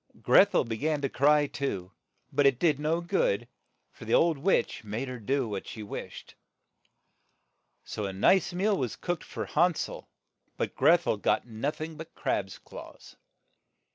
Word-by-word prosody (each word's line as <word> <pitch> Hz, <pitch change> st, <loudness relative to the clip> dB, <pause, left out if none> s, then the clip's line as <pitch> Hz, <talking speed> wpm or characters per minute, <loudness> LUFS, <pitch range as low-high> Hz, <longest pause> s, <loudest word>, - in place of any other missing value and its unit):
Greth -, -, +5 dB
el -, -, +4 dB
be 115 Hz, -1 st, -4 dB
gan 150 Hz, +3 st, 0 dB
to 140 Hz, -, -1 dB
cry, 145 Hz, +3 st, +4 dB
too, 100 Hz, -11 st, -4 dB, 0.4 s
but 140 Hz, 0 st, +4 dB
it 135 Hz, -3 st, +3 dB
did 150 Hz, -1 st, +2 dB
no 160 Hz, +3 st, 0 dB
good, 120 Hz, -, 0 dB, 0.4 s
for -, -, -12 dB
the -, -, +2 dB
old 165 Hz, -4 st, +3 dB
witch 185 Hz, -4 st, +1 dB
made 110 Hz, +5 st, -4 dB
her 125 Hz, -1 st, -6 dB
do 120 Hz, -1 st, -1 dB
as 95 Hz, -, -6 dB
she 110 Hz, -, -7 dB
wished. 100 Hz, -, -8 dB, 1.5 s
So 105 Hz, -, -4 dB
a -, -, -4 dB
nice 140 Hz, -, +3 dB
meal 195 Hz, +4 st, +1 dB
was 125 Hz, -, -2 dB
cooked 175 Hz, -2 st, -3 dB
for -, -, -5 dB
Han 175 Hz, +2 st, +2 dB
sel, -, -, -6 dB, 0.5 s
but -, -, -2 dB
Greth 165 Hz, +5 st, +4 dB
el -, -, +1 dB
got 100 Hz, -, +1 dB
noth 120 Hz, +6 st, -4 dB
ing 160 Hz, 0 st, -5 dB
but 160 Hz, -, -10 dB
crab's 95 Hz, -1 st, -2 dB
claws. -, -, -12 dB
140 Hz, 170 wpm, -28 LUFS, 110-160 Hz, 1.5 s, Greth